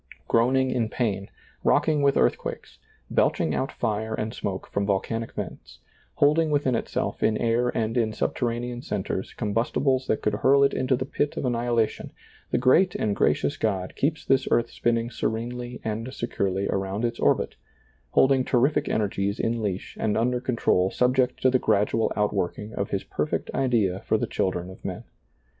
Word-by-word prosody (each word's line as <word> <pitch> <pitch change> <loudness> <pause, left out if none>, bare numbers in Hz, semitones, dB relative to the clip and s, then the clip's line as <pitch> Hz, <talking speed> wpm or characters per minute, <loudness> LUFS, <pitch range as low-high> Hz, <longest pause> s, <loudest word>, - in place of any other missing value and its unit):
Groaning 130 +3 +3
in 120 -4 0
pain, 100 -6 -2 0.3
rocking 155 -2 +3
with 140 -1 +3
earthquakes, - - -1 0.3
belching - - +2
out 135 - -1
fire 110 -1 -2
and 110 +1 -3
smoke 95 -5 -4
from 100 - -2
volcanic 110 +3 -1
vents, - - -7 0.4
holding 155 +2 +3
within 145 -3 +1
itself 115 - -2
in 110 - +2
air 120 +2 +1
and 115 0 -1
in 115 -3 +1
subterranean 120 +2 -2
centers 95 -4 -4
combustibles 125 +4 0
that - - 0
could 105 - +1
hurl 140 +1 +4
it 140 - +3
into 130 0 +1
the 130 +1 -3
pit 145 +2 -2
of - - -2
annihilation, 120 -2 0 0.4
the - - +1
great 180 +9 +4
and 105 - 0
gracious 75 -4 +1
God 95 -4 -1
keeps 150 +2 -1
this 135 - +2
earth 120 0 +2
spinning 115 0 0
serenely 120 +2 -3
and 110 +3 -3
securely 100 -6 -2
around 95 +3 -1
its 115 0 -3
orbit, - - +2 0.6
holding 130 - +4
terrific 130 +4 +2
energies 100 -1 -1
in 115 0 0
leash 100 -3 -3
and 105 -1 0
under 125 +2 +1
control 115 -7 +2
subject 125 +3 +1
to 130 - +5
the 130 - +3
gradual 110 +1 +1
out 105 0 +1
working 105 +2 -3
of - - -2
His - - -2
perfect - - -2
idea 110 -8 +1
for 110 +1 0
the - - -1
children 90 -1 -2
of 95 - -14
men. - - -5
115 Hz, 165 wpm, -25 LUFS, 105-130 Hz, 0.6 s, to